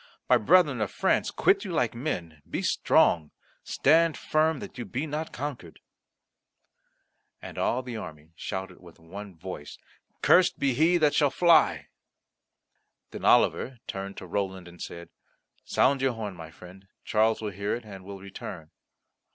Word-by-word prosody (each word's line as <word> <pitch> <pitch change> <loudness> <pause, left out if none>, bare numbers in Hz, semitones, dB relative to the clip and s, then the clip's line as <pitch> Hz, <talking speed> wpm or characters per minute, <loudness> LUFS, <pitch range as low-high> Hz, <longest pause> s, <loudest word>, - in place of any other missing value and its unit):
My - - +6
brethren 145 - +4
of 105 - 0
France, - - +1
quit - - +2
you - - -5
like - - 0
men, 90 - -4
be - - -3
strong; 80 -3 +3 0.3
stand 160 +2 +3
firm 155 0 +1
that 130 - -9
you - - -3
be 125 +8 -4
not 155 +1 -4
conquered." 125 - -6 1.6
And - - -9
all 125 +2 0
the 125 -2 -6
army 75 -5 -9
shouted 95 +2 -6
with 85 -2 -16
one 95 +3 -10
voice, 80 -4 -8 0.5
"Cursed 180 0 +5
be 140 -2 +1
he 160 +7 +3
that 150 -3 +3
shall 145 -2 +3
fly." 170 +3 +4 1.3
Then - - -8
Oliver 130 0 +3
turned 100 0 -6
to - - -7
Roland, 95 -1 -3
and 85 0 -13
said, 85 0 -8 0.6
"Sound 135 0 +2
your 135 -2 +2
horn; 105 -4 -5
my 80 -2 -9
friend, 90 +4 -14 0.2
Charles 110 +1 +2
will 105 -2 -4
hear 100 +2 -2
it, 120 -1 -8
and 95 -3 -10
will 100 +1 -8
return." 90 -4 -9
105 Hz, 155 wpm, -27 LUFS, 90-140 Hz, 1.6 s, My